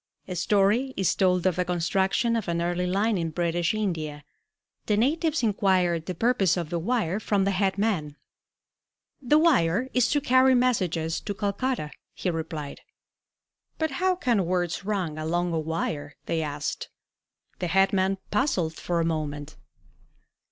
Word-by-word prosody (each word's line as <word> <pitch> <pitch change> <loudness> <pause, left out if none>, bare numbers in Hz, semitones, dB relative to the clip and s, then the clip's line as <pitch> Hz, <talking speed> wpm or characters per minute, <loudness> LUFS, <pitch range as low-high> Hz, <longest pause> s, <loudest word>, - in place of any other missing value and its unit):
A 185 - -4
story 210 +7 +2
is 190 - +2
told 180 -2 +2
of 185 -2 +2
the 180 - +2
construction 190 +6 +1
of 225 -4 -2
an 170 0 -1
early 175 +1 -1
line 200 +2 +1
in 165 -1 -1
British 170 +1 0
India. 160 -8 -3 0.6
The 210 - +2
natives 305 +4 +1
inquired 185 -6 +1
the 185 - -3
purpose 205 -4 +2
of 170 -2 -4
the 170 - -1
wire 205 -1 0
from 205 -2 +1
the 200 - +1
head 195 0 0
man. 185 -9 -1 1.1
"The 285 +3 +3
wire 255 - +3
is 250 -2 +3
to 290 - +2
carry 260 -1 +4
messages 180 -10 +1
to 205 - -4
Calcutta," 200 -4 -2 0.2
he 180 - -1
replied. 160 -3 -5 1.0
"But 315 -1 -1
how 375 0 +3
can 235 - +1
words 175 +1 -1
run 185 -7 -2
along 175 +2 -1
a 165 - 0
wire?" 155 -2 -3
they 165 - -1
asked. 145 -1 -4 0.7
The 180 - -1
head 195 +3 +3
man 190 0 +1
puzzled 200 - +1
for 170 +1 -2
a - - 0
moment. 150 -2 -3
185 Hz, 155 wpm, -26 LUFS, 165-220 Hz, 1.1 s, carry